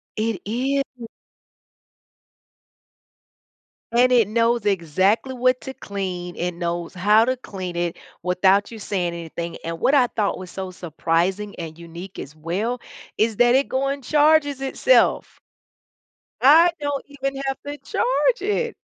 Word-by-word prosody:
It 215 -4 -2
is. 255 +2 -2 2.8
And 245 +2 +4
it 235 -5 +5
knows 230 +1 +1
exactly 195 - +1
what 255 0 +1
to 265 - -7
clean, 185 -6 -5
it 180 +1 -2
knows 170 0 -3
how 210 +4 +4
to 255 +2 0
clean 185 -7 -6
it 175 -1 -2 0.2
without 190 +3 +3
you 225 - -9
saying 180 -4 -2
anything 170 0 -6
and 165 0 -4
what 280 - +3
I 255 -3 +5
thought 210 -3 -1
was 185 -2 -9
so 190 0 -5
surprising 180 +4 -1
and 160 -2 -7
unique 170 +3 -9
as 150 +3 -8
well, 200 +10 -3 0.4
is 220 -1 +1
that 245 0 +5
it 275 +1 +2
go 265 +1 0
and 275 0 -3
charges 295 0 +3
itself. 270 - +2 1.0
I 325 +6 +7
don't 285 -1 -2
even 275 -1 -4
have 270 0 -1
to 290 0 -5
charge - - +1
it! 420 +4 -1
215 Hz, 140 wpm, -22 LUFS, 180-265 Hz, 2.8 s, I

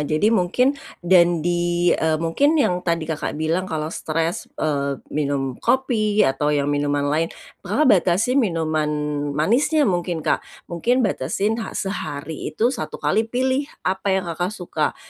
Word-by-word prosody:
jadi 155 +9 +1
mungkin 230 +8 +2 0.3
dan 175 -2 +4
di, 175 0 +1
eee, 160 -1 +1
mungkin 170 - +2
yang 180 - +2
tadi 170 -2 -1
Kakak, 155 -1 -3
bilang 165 +4 -1
kalau 155 0 -3
stres, 165 +2 -2
eee, 140 -2 -2
minum 140 -3 -1
kopi 215 -5 +2
atau 135 +2 +1
ya 145 -1 +1
minuman 145 0 0
lain, 165 +2 +1 0.3
Kakak 305 -4 +3
batasin 200 +8 +3
minuman 160 - 0 0.5
manisnya 280 - +2
mungkin 175 -4 -1
Kak, - - +1 0.2
mungkin 240 +9 0
batesin 205 - -1
ha - - -6
sehari 160 -6 -4
itu 240 +4 +2
satu 235 - -5
kali 220 +1 0
pilih 260 +4 0 0.2
apa 190 +1 0
yang 190 - -1
Kakak 175 +2 -2
suka, 175 -6 -3
175 Hz, 145 wpm, -22 LUFS, 155-215 Hz, 0.5 s, dan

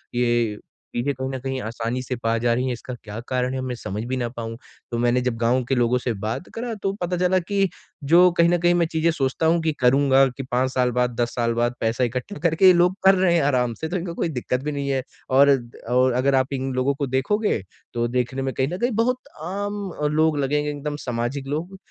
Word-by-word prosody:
ये 120 -3 +1 0.4
चीज़ें 130 +4 0
कहीं 130 0 -4
न 130 - -3
कहीं 135 0 -3
आसानी 115 +2 -3
से 125 0 -4
पा 115 -1 0
जा 120 -1 +3
रही 125 +2 0
हैं 125 - 0
इसका 125 +2 -7
क्या 105 0 -7
कारण 130 +1 -1
में 125 -1 -3
समझ 105 -1 -5
भी 130 +1 -2
ना 120 - -1
पाऊँ? 115 -1 -6 0.3
तो 120 - -1
मैंने 120 +1 +2
जब 125 -2 -1
गाँव 120 +2 +2
के 135 - +2
लोगों 120 0 +2
से 125 -1 -2
बात 110 - -4
करा, 235 0 -4
तो 195 -2 -2
पता 175 0 -1
चला 185 +1 +3
कि 195 +2 0 0.3
जो 175 +5 +6
कहीं 170 0 +5
न 175 - +3
कहीं 175 +1 +3
मैं 175 -1 +3
चीज़ें 160 +1 +2
सोचता 140 +1 -1
हूँ 165 +1 +3
कि 160 0 +1
करूँगा 135 +1 +5
कि 135 - -4
5 130 0 0
साल 125 -1 +1
बाद, 125 0 +1
10 120 0 -1
साल 115 -1 +1
बाद 120 +1 0
पैसा 115 +3 0
इकट्ठा 125 - -3
करके 170 +2 +3
ये 185 - +9
लोग 175 +2 +3
कर 195 0 +8
रहे 185 -2 +3
हैं 170 - +3
आराम 125 -4 +1
से 160 +9 -5
तो 180 - -1
इनको 170 -1 -4
कोई 170 - -1
दिक्कत 125 -2 -2
भी 150 - -2
नहीं 140 -1 -3
है। 135 -1 0 0.3
और 140 +2 +6
अ, 120 -3 -1
और 130 0 +4
अगर 135 +2 +2
आप 130 +1 +1
इन 135 0 -2
लोगों 130 +2 +1
को 140 0 -2
देखोगे 140 - 0 0.3
तो 120 0 0
देखने 125 +2 -1
में 135 0 -2
कहीं 130 - 0
न 175 +5 -4
कहीं 240 +5 0
बहुत 250 +1 +1 0.3
आम 200 +4 -3 0.4
लोग 155 -1 +3
लगेंगे 145 +2 0
एकदम 145 0 -4
सामाजिक 125 +3 -3
लोग। 165 +7 -4
130 Hz, 240 wpm, -23 LUFS, 125-160 Hz, 0.4 s, ये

